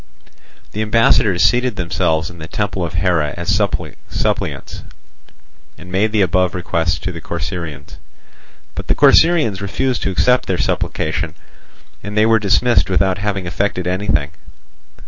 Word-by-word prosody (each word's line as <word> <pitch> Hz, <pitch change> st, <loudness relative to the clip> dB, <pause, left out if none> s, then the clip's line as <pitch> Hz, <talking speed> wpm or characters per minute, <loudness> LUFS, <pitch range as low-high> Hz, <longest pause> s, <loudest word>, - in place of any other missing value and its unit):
The 105 Hz, -, -3 dB
ambassadors 110 Hz, -3 st, +3 dB
seated 125 Hz, -1 st, +2 dB
themselves 85 Hz, -3 st, -1 dB
in 85 Hz, -, -13 dB
the 80 Hz, -, -7 dB
temple 95 Hz, 0 st, -2 dB
of 80 Hz, -2 st, -4 dB
Hera 85 Hz, -6 st, +1 dB
as 85 Hz, -1 st, -4 dB
suppliants, -, -, -2 dB, 0.9 s
and 90 Hz, +1 st, -12 dB
made 105 Hz, +4 st, +1 dB
the 105 Hz, -2 st, +3 dB
above 90 Hz, 0 st, +1 dB
requests 85 Hz, -2 st, -1 dB
to 95 Hz, -, -4 dB
the 85 Hz, -2 st, -8 dB
Corcyraeans. 85 Hz, -4 st, -6 dB, 0.8 s
But -, -, -7 dB
the -, -, +2 dB
Corcyraeans 145 Hz, -, +4 dB
refused 120 Hz, +6 st, -1 dB
to -, -, -1 dB
accept 125 Hz, +7 st, +2 dB
their 95 Hz, -, 0 dB
supplication, -, -, -2 dB, 0.7 s
and 105 Hz, +1 st, -6 dB
they 110 Hz, -, +5 dB
were 115 Hz, 0 st, +4 dB
dismissed 110 Hz, +4 st, +2 dB
without 95 Hz, 0 st, +1 dB
having 100 Hz, -2 st, -2 dB
effected 90 Hz, 0 st, -2 dB
anything. 90 Hz, -6 st, 0 dB
95 Hz, 140 wpm, -18 LUFS, 85-105 Hz, 0.9 s, they